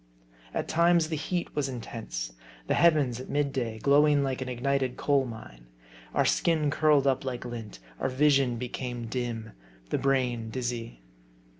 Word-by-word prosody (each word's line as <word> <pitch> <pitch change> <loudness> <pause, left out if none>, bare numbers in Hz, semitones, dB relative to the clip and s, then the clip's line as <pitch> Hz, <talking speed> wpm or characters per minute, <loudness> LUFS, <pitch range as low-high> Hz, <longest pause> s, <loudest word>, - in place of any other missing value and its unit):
At - - -2
times 170 -1 +3
the 160 - -1
heat 170 +4 -3
was 145 -2 0
intense. 110 - -5 0.3
The - - +1
heavens, 150 -8 +3
at 130 - -8
mid 145 -1 0
day, 115 -4 -2
glowing 145 +3 +4
like 135 -1 -2
an 130 - -3
ignited 130 +1 -1
coal 140 -2 +2
mine. - - -10 0.5
Our - - +3
skin 155 -4 +2
curled 150 -2 +4
up 135 -1 +2
like 125 -2 -4
lint; 115 -3 -7 0.2
our - - 0
vision 135 -2 +3
became 125 0 -4
dim; 115 -2 -4 0.4
the - - +1
brain 125 -4 0
dizzy. 115 - -4
130 Hz, 155 wpm, -28 LUFS, 120-145 Hz, 0.5 s, glowing